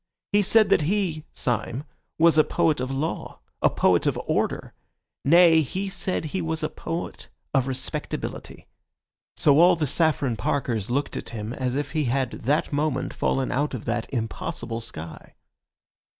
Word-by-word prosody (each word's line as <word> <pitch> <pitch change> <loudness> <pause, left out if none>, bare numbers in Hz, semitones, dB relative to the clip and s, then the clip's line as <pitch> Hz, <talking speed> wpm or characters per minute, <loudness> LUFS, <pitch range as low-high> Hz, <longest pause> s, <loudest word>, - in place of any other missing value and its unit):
He 205 0 +4
said 215 +2 +4
that - - +4
he 180 -6 -1
(Syme) 120 +2 -2 0.3
was 160 -1 +6
poet 155 -4 +2
of 130 0 -2
law, 140 +5 -3 0.2
a - - +5
poet - - +2
of - - 0
order; - - -1 0.5
nay, 165 +1 +6
he 190 +7 -3
said 185 -3 -2
he 180 +5 -3
was 160 -1 -3
a 155 - 0
poet 165 +1 -5 0.3
of 135 -2 +2
respectability. 130 -1 -5 0.7
So 145 0 +5
all 175 +1 +7
the 160 -2 -1
Saffron 145 -5 +1
Parkers 115 -2 -1
looked 140 +4 -1
at - - -5
him 110 0 -5
as 130 -1 -2
if 145 -1 -2
he 155 -2 0
had 130 0 0
that 145 +5 -1
moment 145 -2 -1
fallen 135 -1 0
out 145 +1 0
of 115 - -7
that 115 0 -2
impossible 120 0 -3
sky. 85 -9 -9
145 Hz, 155 wpm, -25 LUFS, 125-165 Hz, 0.7 s, all